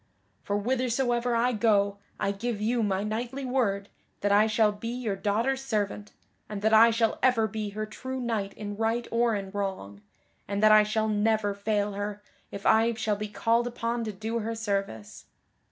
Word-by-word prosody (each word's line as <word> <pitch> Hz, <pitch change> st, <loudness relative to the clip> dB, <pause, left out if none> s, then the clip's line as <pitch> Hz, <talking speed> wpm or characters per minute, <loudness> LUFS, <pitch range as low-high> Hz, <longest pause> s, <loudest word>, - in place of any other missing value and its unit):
For 205 Hz, -, -1 dB
whithersoever 245 Hz, +1 st, 0 dB
I 240 Hz, +2 st, +2 dB
go 205 Hz, -3 st, +2 dB, 0.2 s
I 200 Hz, -, 0 dB
give 215 Hz, +2 st, -3 dB
you 230 Hz, +3 st, +1 dB
my 200 Hz, -2 st, 0 dB
knightly 240 Hz, +6 st, -3 dB
word 215 Hz, -6 st, 0 dB, 0.3 s
that 205 Hz, -, +1 dB
I 210 Hz, +2 st, +5 dB
shall 215 Hz, -1 st, +3 dB
be 210 Hz, +2 st, -7 dB
your 235 Hz, -4 st, -2 dB
daughter's 230 Hz, +7 st, 0 dB
servant, 210 Hz, -4 st, -2 dB, 0.4 s
and 205 Hz, -1 st, -5 dB
that 220 Hz, +1 st, +3 dB
I 225 Hz, +1 st, +8 dB
shall 225 Hz, 0 st, +1 dB
ever 250 Hz, -4 st, +3 dB
be 215 Hz, 0 st, -4 dB
her 215 Hz, -, -1 dB
true 260 Hz, +4 st, -6 dB
knight 225 Hz, -5 st, -2 dB
in 205 Hz, -1 st, -6 dB
right 225 Hz, +2 st, 0 dB
or 230 Hz, -1 st, +2 dB
in 195 Hz, -1 st, -5 dB
wrong, 190 Hz, -, -4 dB, 0.5 s
and 200 Hz, +1 st, -2 dB
that 215 Hz, -, +7 dB
I 215 Hz, 0 st, +8 dB
shall 215 Hz, +1 st, 0 dB
never 210 Hz, -1 st, +1 dB
fail 205 Hz, 0 st, -1 dB
her 205 Hz, +1 st, -5 dB, 0.3 s
if 200 Hz, -, -8 dB
I 225 Hz, +1 st, +4 dB
shall 220 Hz, -2 st, 0 dB
be 210 Hz, +1 st, -4 dB
called 230 Hz, +3 st, +1 dB
upon 235 Hz, 0 st, -2 dB
to 215 Hz, -, -3 dB
do 220 Hz, +4 st, -3 dB
her 225 Hz, +1 st, -3 dB
service." 195 Hz, -, -4 dB
215 Hz, 185 wpm, -27 LUFS, 205-235 Hz, 0.5 s, I